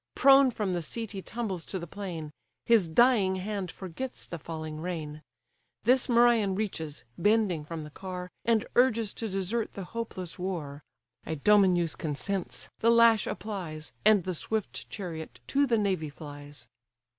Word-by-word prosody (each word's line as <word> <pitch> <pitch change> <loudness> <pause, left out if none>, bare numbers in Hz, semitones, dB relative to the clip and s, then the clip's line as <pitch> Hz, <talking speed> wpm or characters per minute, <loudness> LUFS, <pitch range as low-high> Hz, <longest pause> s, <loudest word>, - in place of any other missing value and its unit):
Prone 275 -1 +7
from 210 -5 -2
the 175 - -1
seat 225 +7 -4
he 195 -3 -5
tumbles 200 -6 -4
to 190 - -4
the 170 - -5
plain; 170 -4 -6 0.3
His 225 -7 +5
dying 200 +1 +4
hand 195 0 -3
forgets 195 +10 -6
the 170 - -7
falling 155 0 -6
rein: 155 -4 -4 0.6
This 255 +1 +4
Merion 235 -5 +4
reaches, 165 -8 -4 0.2
bending 205 -4 +2
from 160 +1 -6
the 150 - -10
car, 180 +1 -6
And 225 -1 +2
urges 230 -4 +3
to 225 - -4
desert 195 +4 -1
the 195 - -6
hopeless 185 -4 -5
war: 160 -6 -4 0.5
Idomeneus 175 0 +3
consents; 145 -3 -3
the 230 - +3
lash 230 -2 +6
applies; 175 -8 -5
And 215 -3 +5
the 185 +1 -2
swift 215 +5 -3
chariot 165 -6 -6
to 280 +1 +3
the 235 -2 +3
navy 190 -7 0
flies. 145 -3 -10
190 Hz, 150 wpm, -29 LUFS, 160-220 Hz, 0.6 s, Prone